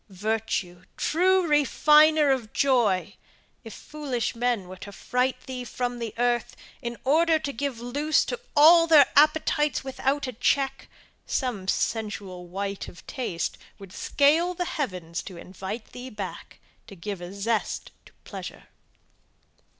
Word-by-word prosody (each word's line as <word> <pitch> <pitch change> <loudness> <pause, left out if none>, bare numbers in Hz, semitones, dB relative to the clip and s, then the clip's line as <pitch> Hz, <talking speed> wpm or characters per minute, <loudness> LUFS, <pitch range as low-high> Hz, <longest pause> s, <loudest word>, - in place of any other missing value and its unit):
Virtue, 195 -3 -3
true 370 +3 +2
refiner 300 0 +5
of 240 -5 -1
joy! 235 -9 +2 0.5
if 225 - -9
foolish 275 -2 -4
men 235 -5 -1
were 185 - -9
to 200 +2 -9
fright 250 +5 -1
thee 255 -1 -5
from 245 0 -4 0.2
earth, 240 0 0 0.3
in 235 0 -5
order 320 +4 +4
to 285 -2 -4
give 270 -1 -3
loose 285 +6 +1
to - - -4 0.2
all 330 +3 +7
their 305 -4 +8
appetites 300 -1 +3
without 270 +2 -1
a 255 - -5
check 270 +3 0 0.4
some 230 -8 -2
sensual 200 -4 -2
wight 195 +2 -4
of 175 - -13
taste 205 -10 -4 0.2
would 195 -2 -12
scale 325 +5 +2
the 355 - -2
heavens 180 - -4
to 185 - -10
invite 190 +5 -7
thee 250 +1 -8
back, 205 -5 -8 0.3
to 200 - -11
give 190 +1 -6
a 175 +1 -7
zest 210 +3 -2 0.2
to - - -20
pleasure! - - -9
245 Hz, 135 wpm, -26 LUFS, 200-290 Hz, 0.5 s, their